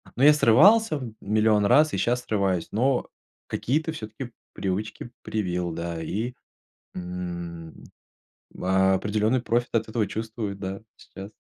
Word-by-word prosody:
Ну 130 - 0
я 150 +1 +9
срывался 165 - +5
в 125 -5 -7
1000000 105 0 +2
раз, 150 +7 +5
и - - 0
щас 120 +6 0
срываюсь, 95 -5 0
но 125 +4 +1 0.4
какие-то 155 +6 -1
всё-таки 115 -1 -7 0.2
привычки 105 +5 -4
привил, 90 -5 -2
да, 85 0 -4
и, 110 +9 -3 0.6
м. 85 -2 -6 0.8
Определенный 100 +5 +2
профит 120 0 0
от 110 -1 +1
этого 110 -1 0
чувствую, 110 -2 -4
да, 95 +1 -6
сейчас. 95 +2 -11
105 Hz, 125 wpm, -25 LUFS, 95-120 Hz, 0.8 s, я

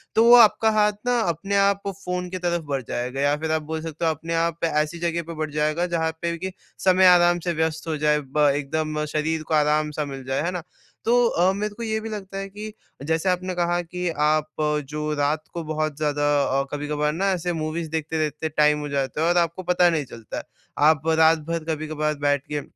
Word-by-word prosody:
तो 225 - +5
वो 240 +1 +8
आपका 225 -1 +6
हाथ 210 -1 +3
ना 245 -1 +2
अपने 185 +1 -1
आप 200 0 +3 0.2
फ़ोन 180 0 -3
की 185 - -4
तरफ 175 -1 -1
बढ़ 135 -2 -1
जाएगा 125 +3 -3
या 145 +1 +3
फिर 160 +1 -3
आप 160 0 +1
बोल 160 0 -2
सकते 165 +1 -4
हो 160 - +3
अपने 160 +2 -5
आप 165 0 -1
ऐसी 155 +1 0
जगह 170 0 -1
पे 170 - -5
बढ़ 155 -1 -3
जाएगा, 155 +3 0
जहाँ 165 -2 0
पे 170 0 -2
कि 190 +3 -4 0.3
समय 185 0 +5
आराम 175 -1 +5
से 175 - 0
व्यस्त 160 0 -2
हो 160 -1 -1
जाए 150 0 +2
ब 145 +1 +2
एकदम 150 +2 -2
शरीर 155 +1 -1
को - - -2
आराम-सा 150 0 +1
मिल 135 -2 -7
जाए। 135 +1 -1
है 175 - -1
ना? 180 -2 -5 0.4
तो 245 +1 +4
अ, 180 -3 +2
मेरे 210 +1 -3
को 235 - -6
ये 220 -1 -1
भी 220 +1 -6
लगता 195 -2 -6
है 195 0 -4
कि 210 +2 -8 0.3
जैसे 160 +3 +1
आपने 185 0 -1
कहा 175 0 +1
कि 180 +1 -4
आप 155 0 +2 0.4
जो 150 0 -2
रात 145 +2 0
को 170 - -4
बहुत 155 -1 -2
ज़्यादा 145 -1 0 0.2
अ, 135 +1 +1
कभी-कभार 150 0 -1
ना 195 +5 0
ऐसे 175 -1 -1
मूवीज़ 160 0 -3
देखते-देखते 155 -1 -2
टाइम 150 -1 +3
हो 150 0 -5
जाता 140 +1 -2
है 165 - +2
और 175 - +2
आपको 170 +1 0
पता 180 0 +4
नहीं 160 -4 -1
चलता 115 -3 -9
है। - - -4 0.4
आप 155 0 +3
रातभर 160 0 +3
कभी-कभार 155 0 -2
बैठ 145 -1 +2
के, 150 -1 -3
160 Hz, 220 wpm, -24 LUFS, 150-180 Hz, 0.4 s, वो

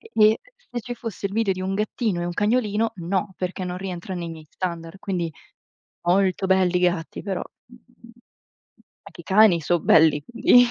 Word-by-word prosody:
E 450 - -16 0.2
e, 220 - +1 0.3
se 240 -1 -3
ci 245 +2 -6
fosse 225 -4 -7
il 195 - -7
video 215 -3 +1
di 185 - -5
un 190 +1 -2
gattino 210 -2 -1
e 175 - -2
un 175 - -3
cagnolino, 220 0 +1
no, 190 +3 -2
perché 185 0 -3
non 180 0 -4
rientra 185 -1 -6
nei 170 -2 -4
miei 160 -1 -9
standard; 170 0 -5
quindi, 175 -5 -3 0.7
molto 190 +2 +2
belli 185 -1 +3
i - - 0
gatti, 175 -2 -1
però, 195 -3 -2 0.2
mhmm, 240 -1 -19 0.9
anche - - -12
i - - -21
cani 195 -4 +5
so 175 +2 +1
belli, 155 -2 +5
quindi 240 +1 +5
190 Hz, 185 wpm, -24 LUFS, 175-215 Hz, 0.9 s, cani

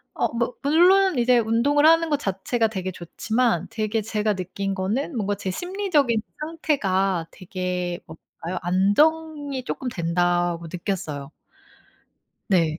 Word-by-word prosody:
어 - - +1
뭐 235 +1 -1
물론 355 +2 +5
이제 245 +1 +4
운동을 235 +7 +2
하는 330 +1 +5
거 295 - +2
자체가 225 0 0
되게 190 -3 -4
좋지만 225 +7 -1
되게 215 0 -1
제가 215 0 0
느낀 195 +2 -3
거는 220 - -2
뭔가 205 -2 0
제 190 -1 -4
심리적인 345 - 0 0.2
상태가 195 - 0
되게 180 -1 -4
뭐랄까요 165 +2 -7
안정이 285 - +1
쪼끔 260 - -4
된다고 175 -2 0
느꼈어요. 160 -5 -4 1.2
네. 165 -5 +2
215 Hz, 270 characters per minute, -24 LUFS, 180-285 Hz, 1.2 s, 물론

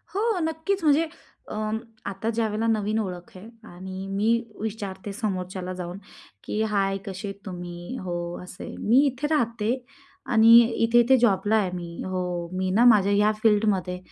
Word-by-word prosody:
हो, 410 - +1 0.2
नक्कीच 320 +4 -2
म्हणजे 310 +2 +4 0.4
अ, - - -5 0.5
आता 200 +3 -3
ज्यावेळेला 225 -1 -1
नवीन 215 -1 +1
ओळख 180 -3 -5
आहे 185 +4 -11 0.2
आणि 190 +2 -7
मी 205 +3 +1 0.3
विचारते 205 -2 -5
समोरच्याला 185 -4 -3
जाऊन 180 0 -6 0.5
की 215 - -2
"हाय! 200 -3 +1
कसे 195 +1 -6
आहेत 195 - -5
तुम्ही? 175 +2 -7
हो, 175 -1 -3 0.3
असे 180 0 -10
आहे. - - -7
मी 230 +4 +2
इथे 275 +1 -1
राहते 235 -8 0 0.6
आणि 225 0 +6 0.4
इथे-इथे 240 +3 +5
जॉबला 210 -3 +2
आहे 205 -4 +2
मी. 170 -1 -6
हो, 180 -2 -3
मी 185 0 0
ना 225 +6 +4
माझ्या 205 -4 +6
ह्या 210 +1 +4
फिल्डमध्ये. 205 -4 +2
205 Hz, 155 wpm, -25 LUFS, 185-225 Hz, 0.6 s, आणि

